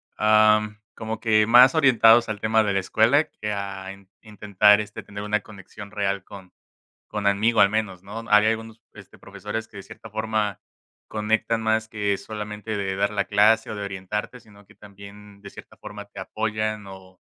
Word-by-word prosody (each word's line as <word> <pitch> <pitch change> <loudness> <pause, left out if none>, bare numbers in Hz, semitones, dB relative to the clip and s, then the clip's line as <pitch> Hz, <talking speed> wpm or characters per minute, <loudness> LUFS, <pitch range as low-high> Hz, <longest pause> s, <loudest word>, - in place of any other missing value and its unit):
am, 105 0 +3 0.2
como 110 0 -6
que 110 -2 +2
más 125 +2 +7
orientados 120 -6 +5
al 105 -1 -4
tema 110 0 +2
de 100 - -1
la 95 - +1
escuela 110 - +2
que 105 - -6
a 100 -1 -5
in 100 0 -18
intentar, 105 -1 +2
este, 105 -1 -6
tener 100 0 -9
una 105 0 0
conexión 100 0 -12
real 100 -2 -2
con 95 -2 -13 0.6
con 105 -1 -4
amigo, 110 +3 +2
al 100 - +5
menos, 105 -4 -3
¿no? 110 +3 -8
Había 105 +1 +5
algunos, 110 0 -6
este, - - -15
profesores 110 +2 -7
que, 110 - -16
de - - -8
cierta 115 - -13
forma, 110 -2 -2 0.5
conectan 110 +1 -1
más 110 0 0
que 105 -2 -1
solamente 105 0 -6
de 95 -1 -3
dar 100 +1 0
la 100 -1 -1
clase 110 +2 +3
o 110 - -5
de 105 - -6
orientarte, 100 +5 -5
sino 105 -2 -20
que - - -20
también, 100 0 -14
de 100 - -10
cierta - - -14
forma, 105 0 -10
te 100 - -11
apoyan 110 -1 -3
o 95 -1 -14
105 Hz, 185 wpm, -23 LUFS, 100-110 Hz, 0.6 s, más